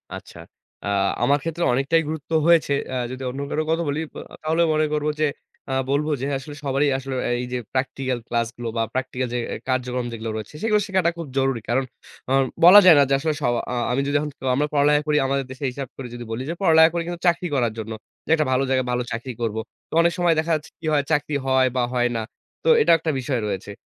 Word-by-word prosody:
আচ্ছা। - - -11 0.5
আ - - -3 0.4
আমার 145 +1 +4
ক্ষেত্রে 165 +1 -3
অনেকটাই 140 +6 +2
গুরুত্ব 155 0 -6 0.2
হয়েছে। 165 -4 +4 0.2
আ - - -2 0.2
যদি 130 +1 -6
অন্য 135 +3 -5
কারো 155 - -1
কথা 165 +1 +1
বলি 145 +2 -1
বো - - -10 0.2
তাহলে 160 +2 +1
মনে 155 0 +2
করবো 150 0 0
যে - - +4 0.4
আ - - -1 0.2
বলবো 150 +2 +1
যে - - -1
আসলে 145 +2 -9
সবারই 140 +1 +1
আসলে 135 0 -5
আ - - -1
এইযে 125 0 -3 0.2
practical 130 -1 -1
ক্লাসগুলো 120 0 -2
বা - - +2
practical 130 0 -2
যে - - 0 0.2
এ - - -3
কার্যক্রম 125 -1 -1
যেগুলো 115 -1 -5
রয়েছে 110 +5 -6
সেগুলো 210 -2 +3
শেখাটা 185 -3 +2
খুব 165 -3 -6
জরুরি। 135 -4 +1
কারণ 130 +3 +2 0.5
অন 135 0 +4 0.2
বলা 195 +4 +11
যায় 170 -4 +9
না - - +7
যে - - +2
আসলে 155 +1 0
সব 120 - +2 0.2
আ - - -2 0.2
আমি 135 +3 +1
যদি 145 - -1
এখন 150 0 -3 0.3
আমরা 150 +2 +1
পড়ালেখা 145 +1 +4
করি 150 0 +2
আমাদের 135 -1 0
দেশে 135 +2 -5
হিসাব 135 0 -6
করে 130 -2 -6
যদি 120 0 -7
বলি 115 +3 -3
যে - - -1
পড়ালেখা 160 -2 +6
করি 170 - 0
কিন্তু 175 0 -5
চাকরি 175 +1 +2
করার 120 -4 +1
জন্য। 110 0 -5 0.3
যে - - -14
একটা 155 -2 +1
ভালো 130 +1 +2
জায়গায় 130 -1 +1
ভালো 125 0 0
চাকরি 120 +3 -4
করবো। 110 -1 -1 0.3
তো - - -12
অনেক 170 0 +2
সময় 175 -2 +3
দেখা 165 +1 -1
যাচ্ছে 150 - -6
কি 165 - -10
হয়? 145 -1 +3
চাকরি 150 -1 +1
হয় 130 -1 +3
বা 125 - +2
হয় 120 0 +2
না। 115 - -1 0.4
তো - - -3
এটাও 165 - +6
একটা 160 0 -1
বিষয় 125 -2 -2
রয়েছে। 100 0 -4
140 Hz, 230 wpm, -23 LUFS, 125-155 Hz, 0.5 s, বলা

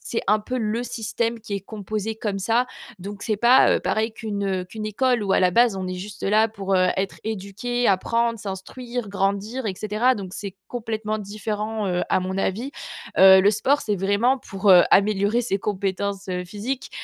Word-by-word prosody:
c'est 230 - -3
un 210 +1 +5
peu 250 +4 -4
le 225 +1 -1
système 230 -1 -2
qui 210 -2 -5
est 200 - -2
composé 215 +2 -4
comme 210 -2 -3
ça, 230 +6 +1 0.3
donc, 200 +2 -7
c'est 215 -3 0
pas, 240 +4 +6
heu, - - -3
pareil 220 +1 0
qu'une, 210 -3 -4
heu, 190 -2 -1
qu'une 215 +4 -6
école 240 +1 +1
où 195 - 0
à - - +4
la 185 -1 +4
base, 235 +2 +4
on 185 -1 -4
est 185 - -3
juste 200 +3 -8
là 215 +2 +3
pour, 195 -3 -3
heu, 185 0 +3
être 195 0 -2
éduqué, 220 +4 -2
apprendre, 230 +4 +1
s'instruire, 220 +4 -6
grandir 200 +5 -1
et 195 - -2
cetera. 215 +6 +1
Donc, 195 -4 -6
c'est 200 -3 -6
complètement 220 -2 -3
différent, 210 +1 -3
heu, 180 -1 0
à - - +3
mon 190 +1 -3
avis. 220 +8 -1 0.5
Heu, 190 0 +9
le 200 +2 +5
sport 260 +8 +1
c'est 210 -2 -1
vraiment 205 +8 +2
pour, 195 -3 0
heu, 180 -2 +9
améliorer 205 +3 +3
ses 220 -5 -1
compétences, 200 0 -3
heu, 180 -1 -2
physiques. 215 +8 -5
210 Hz, 195 wpm, -23 LUFS, 195-225 Hz, 0.5 s, Heu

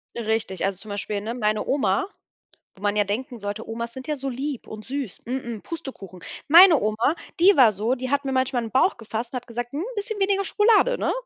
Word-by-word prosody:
Richtig, 220 -4 -2
also, 195 -2 -1
zum 215 - -11
Beispiel, 205 0 -3
ne, 225 +2 -4
meine 215 -3 0
Oma 335 +7 +1 0.7
wo 195 - -18
man 205 0 +1
ja 210 - +3
denken 230 +4 -4
sollte, 205 +2 -5
Omas 235 +1 -4
sind 260 -1 -9
ja 305 - -1
so 275 -1 -5
lieb 265 +1 -4
und 215 0 -8
süß, 270 -6 -5
mm, 240 -3 -4
Pustekuchen. 200 - -8 0.3
Meine 340 +2 +9
Oma, 215 +9 +1 0.2
die 390 +3 +6
war 240 -5 +7
so, 220 +6 -1
die 255 +1 -4
hat 280 +1 0
mir 270 - -2
manchmal 260 -1 0
in 225 - -6
Bauch 265 - +2
gefasst 230 +1 -5
und - - -4
hat 245 - -14
gesagt: 240 +1 -5
„'N 300 - -2
bisschen 415 0 -3
weniger 395 0 +2
Schokolade, 450 +5 +4
ne?“ - - 0
245 Hz, 220 wpm, -24 LUFS, 215-285 Hz, 0.7 s, Meine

